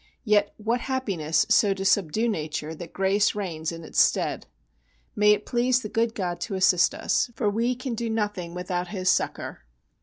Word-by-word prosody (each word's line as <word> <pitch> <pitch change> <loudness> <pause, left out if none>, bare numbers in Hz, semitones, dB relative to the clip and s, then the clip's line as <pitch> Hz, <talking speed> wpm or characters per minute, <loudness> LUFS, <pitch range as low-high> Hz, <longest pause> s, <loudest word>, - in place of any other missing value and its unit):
Yet 210 -3 +2
what 230 +3 -1
happiness 190 - 0
so 200 -2 +4
to 195 0 -5
subdue 200 +3 +2
nature 155 -5 -3
that 165 +1 -9
grace 195 +2 +1
reigns 170 -6 -3
in 165 0 -8
its - - +2
stead! - - +1 0.7
May 210 0 +5
it 210 0 -3
please 250 +1 +1
the 210 - -5
good 230 +1 0
God 175 -3 -3
to 200 - -3
assist 185 -2 +3
us, - - 0
for 215 - -1
we 235 +4 0
can 255 0 -5
do 230 0 -3
nothing 205 -6 -3
without 180 0 -3
His 185 -1 +1
succour. - - -2
200 Hz, 180 wpm, -25 LUFS, 175-225 Hz, 0.7 s, May